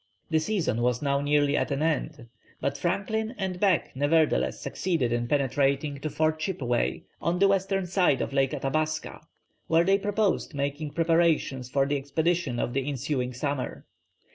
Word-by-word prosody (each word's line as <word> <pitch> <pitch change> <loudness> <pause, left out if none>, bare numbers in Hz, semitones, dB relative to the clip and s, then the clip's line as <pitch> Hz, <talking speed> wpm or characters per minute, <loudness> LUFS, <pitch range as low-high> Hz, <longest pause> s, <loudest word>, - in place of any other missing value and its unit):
The 160 - +4
season 160 - -1
was 125 +2 +1
now 140 -1 +1
nearly 145 0 +2
at - - 0
an 140 +1 -1
end, 155 -4 -2 0.3
but - - -1
Franklin 220 +4 -1
and 190 -2 -3
Back 190 -5 +2
nevertheless 145 - +2
succeeded 160 -10 -1
in 120 0 -1
penetrating 140 +1 +1
to 155 - -3
Fort 155 +2 0
Chippeway 135 -9 -1 0.2
on 170 +1 0
the 195 +2 +5
western 195 -1 +1
side 180 -5 +2
of - - -3
Lake 135 -1 +2
Athabasca, 155 +4 -2 0.5
where 165 +1 +4
they 195 +2 +3
proposed 205 -5 0
making 145 +1 -3
preparations 165 -6 +1
for 135 +1 +2
the 145 +1 0
expedition 145 0 -1
of 120 - -2
the 135 +2 -1
ensuing 130 -2 -2
summer. 140 +2 -3
150 Hz, 160 wpm, -27 LUFS, 135-170 Hz, 0.5 s, the